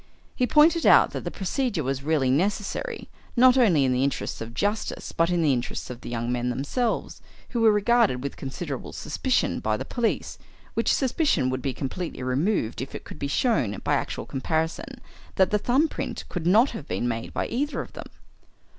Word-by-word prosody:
He 250 - +1
pointed 320 +6 +5
out - - +6
that - - -5
the - - -1
procedure 195 - -2
was 135 +1 -2
really 140 -3 +1
necessary, 205 - -1 0.3
not 255 +1 +7
only 185 - +4
in 130 - +2
the 125 +1 +1
interests 140 -3 -2
of 115 +1 -7
justice 205 - -2
but 165 +1 +1
in 175 -2 +1
the 145 -3 +4
interests 125 0 -3
of 125 0 -9
the - - -7
young 120 0 -2
men 125 0 -1
themselves, 145 - -2 0.3
who 235 - -1
were 225 -1 +6
regarded 210 - +2
with 140 - -4
considerable 135 0 -6
suspicion 255 - 0
by - - 0
the - - -5
police, 240 -2 -2 0.3
which - - +1
suspicion 265 - +1
would 130 0 -2
be 135 - -1
completely 135 +3 -5
removed 130 - 0
if 135 - -6
it - - -7
could - - -11
be 140 - -2
shown 140 - +1
by - - +1
actual - - -2
comparison 160 - -2 0.4
that 190 - +3
the 210 - +2
thumb 265 +9 +2
print - - -5
could 175 -2 -3
not 220 +9 +5
have 165 -11 -8
been 120 - -1
made 115 -1 -3
by - - -2
either 290 +5 -2
of - - -6
them. - - -8
165 Hz, 195 wpm, -25 LUFS, -, 0.4 s, not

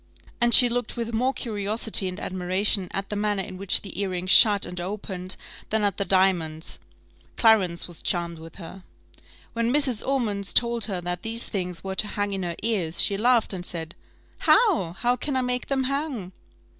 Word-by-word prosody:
and 240 0 +3
she 250 - +9
looked 240 0 -2
with 230 0 -3
more 250 +4 +1
curiosity 215 -4 -2
and 185 +1 -5
admiration 185 +2 0
at 195 +1 -5
the - - -2
manner 205 -1 -1
in 185 - -8
which 190 0 -1
the 195 -1 -5
earring 185 -2 -3
shut 205 +2 +6
and 180 0 -6
opened 185 -1 -5 0.3
than 220 -1 0
at 200 -2 0
the 200 - 0
diamonds. 175 -4 0 0.6
Clarence 195 -7 +3
was 175 -2 -7
charmed 170 -2 -2
with 165 0 -12
her. 190 +1 -10 0.7
When 230 +1 0
Mrs. 265 -6 +2
Ormond 215 -8 -1
told 235 -2 +2
her 190 -4 -4
that 175 0 -4
these 225 +2 -2
things 180 -4 -4
were 190 0 -4
to 210 - +1
hang 205 -1 -3
in 195 - -3
her 175 -2 -3
ears, 185 -8 -1
she 200 - +4
laughed 235 +1 +2
and 180 -2 -5
said, 165 -2 -4 0.5
"How! 335 - +3
how 245 +6 0
can 280 +2 -3
I 260 - +1
make 250 0 -2
them 270 -1 0
hang?" 270 - -3
200 Hz, 185 wpm, -25 LUFS, 180-235 Hz, 0.7 s, she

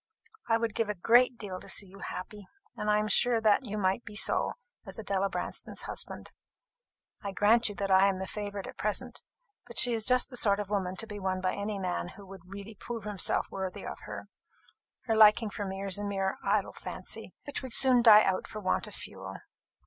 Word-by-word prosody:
I 225 - +4
would 230 -2 -2
give 225 -2 -1
a 210 - -1
great 240 +6 +4
deal 190 -4 -6
to - - -10
see 205 - +3
you 195 +1 -15
happy; 200 +2 -7 0.3
and 210 - -3
I 210 - +4
am 210 0 0
sure 235 +3 +3
that 220 +3 +3
you 210 0 -4
might 195 +3 0
be 210 - -10
so 205 - +2 0.3
as - - -8
Adela 195 -2 -1
Branston's - - -3
husband. - - -6 0.9
I 200 - -4
grant 220 +3 +3
you 205 - -8
that 195 -1 -2
I 190 +1 +6
am 195 -1 0
the 190 - -4
favourite 205 +1 -5
at - - -10
present; 235 +4 -2 0.5
but 235 - -10
she 245 -2 +6
is 225 -1 0
just 250 +2 +2
the 245 - -2
sort 200 -3 +3
of 205 -1 -5
woman 190 -3 -1
to 225 - -2
be 210 -2 -8
won 190 -1 -2
by 185 0 -1
any 205 0 -3
man 85 - -3
who 200 - -12
would 190 -1 -11
really 200 +3 -9
prove 230 +2 -7
himself 205 -3 0
worthy 190 -1 -5
of - - -6
her. - - -7 0.8
Her 225 - 0
liking 215 0 +6
for 205 - -4
me 190 +1 -5
is 195 0 +3
a - - -4
mere 195 -1 -2
idle 200 0 0
fancy, - - -5
which 285 - -5
would 260 -3 -7
soon 255 -2 +7
die 215 -2 +8
out 190 -1 -1
for 215 - -7
want 185 -3 -1
of - - -9
fuel. - - -8
205 Hz, 220 wpm, -29 LUFS, 195-225 Hz, 0.9 s, die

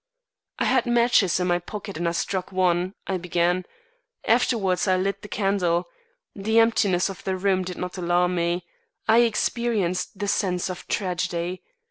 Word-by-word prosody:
"I - - 0
had 255 -1 +2
matches 235 -7 +3
in 180 - 0
my 175 -1 +2
pocket 200 +2 -7
and 170 +1 -1
I - - -3
struck 185 +2 -2
one," 185 0 +1
I 190 - -1
began. 175 +1 0 0.6
"Afterwards 220 -6 +2
I 185 0 +3
lit 195 +2 -1
the - - -9
candle. 190 -4 0 0.5
The 220 +3 0
emptiness 210 -5 +3
of 195 -2 -8
the 190 -1 -1
room 190 0 +1
did 180 -1 -6
not 180 +1 -5
alarm 175 +1 +2
me. 170 0 -1 0.4
I 225 +1 +6
experienced 220 -5 0
the 205 +1 -3
sense 185 -2 0
of 180 - -9
tragedy. 180 -1 -2
185 Hz, 160 wpm, -24 LUFS, 180-205 Hz, 0.6 s, I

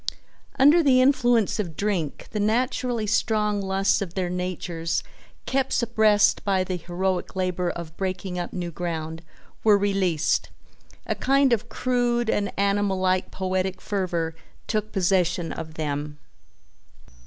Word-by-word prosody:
Under 290 +6 +6
the 265 -5 +4
influence 245 -5 +3
of 170 -7 -3
drink 190 -8 -2
the 210 - -2
naturally 240 +1 0
strong 210 -1 +1
lusts 195 0 +1
of 180 -3 -5
their 180 -2 -1
natures, 180 -2 -2 0.4
kept 270 0 0
suppressed 215 -3 +3
by 190 -2 +1
the 185 0 -3
heroic 180 +2 -2
labor 180 -1 -1
of 170 -2 -6
breaking 185 -1 -3
up 175 - -4
new 175 -2 -4
ground, 160 -1 -4 0.4
were 210 -2 +6
released. 195 -5 +1 0.6
A - - 0
kind 275 -1 +3
of 235 +1 -1
crude 240 -1 0
and 200 -1 0
animal 200 0 +1
like 185 0 +1
poetic 185 0 -2
fervor 175 -5 -2 0.3
took 215 -1 -2
possession 180 -3 +1
of 160 -1 -7
them. 150 -1 -3
190 Hz, 130 wpm, -25 LUFS, 175-220 Hz, 0.6 s, Under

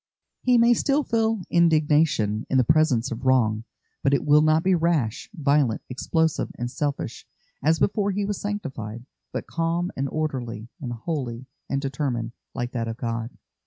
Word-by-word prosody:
He 250 -1 +4
may 235 +1 +6
still 280 +5 +1
feel 225 -4 0
indignation 150 -10 +3
in 135 - +2
the 130 - +5
presence 145 -4 +3
of 115 +2 -5
wrong, 115 -4 +2 0.4
but 140 0 +3
it - - -1
will 150 0 +6
not 155 +1 +3
be 190 - +3
rash, 160 -10 0
violent, 140 - +1
explosive, 160 +5 0
and 120 +1 -3
selfish, 145 +1 -3 0.4
as 160 +2 +4
before 205 +2 +1
he 200 +1 -1
was 205 -1 -3
sanctified, 130 - -5 0.3
but - - -4
calm 170 +2 -1
and 135 +1 -2
orderly, 125 -8 -3
and 125 -4 -4
holy, 125 -1 -4 0.2
and 135 0 0
determined, 130 -4 -2 0.2
like 120 0 -3
that 115 -2 -2
of 115 0 -4
God. 115 0 -4
145 Hz, 160 wpm, -25 LUFS, 120-165 Hz, 0.4 s, may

